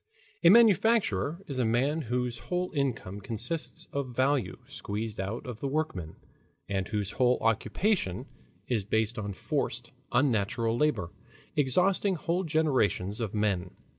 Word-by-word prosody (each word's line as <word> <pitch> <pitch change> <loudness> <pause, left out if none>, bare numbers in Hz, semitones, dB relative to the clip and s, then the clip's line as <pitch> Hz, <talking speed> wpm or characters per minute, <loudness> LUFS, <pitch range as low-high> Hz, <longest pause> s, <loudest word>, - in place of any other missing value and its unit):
A 170 - +8
manufacturer 200 - +4
is 135 -3 -4
a - - +3
man 130 +8 +1
whose 125 -1 -1
whole 180 0 -1
income 120 - -2
consists 115 - -2
of 130 -4 -3
value 135 0 +1
squeezed 105 +1 -5
out 100 +5 -3
of 120 -3 -6
the 140 - -2
workmen, 135 - -2 0.5
and 95 -2 -1
whose 105 -2 -2
whole 125 +1 +3
occupation 115 - 0 0.4
is 115 -5 0
based 110 +2 0
on 100 -1 -4
forced, - - -2 0.2
unnatural 115 -3 +1
labor, 120 - +1 0.4
exhausting 180 +8 +2
whole 175 +3 -1
generations 130 - +1
of 110 -2 -3
men. 100 -4 0
120 Hz, 135 wpm, -29 LUFS, 105-155 Hz, 0.5 s, A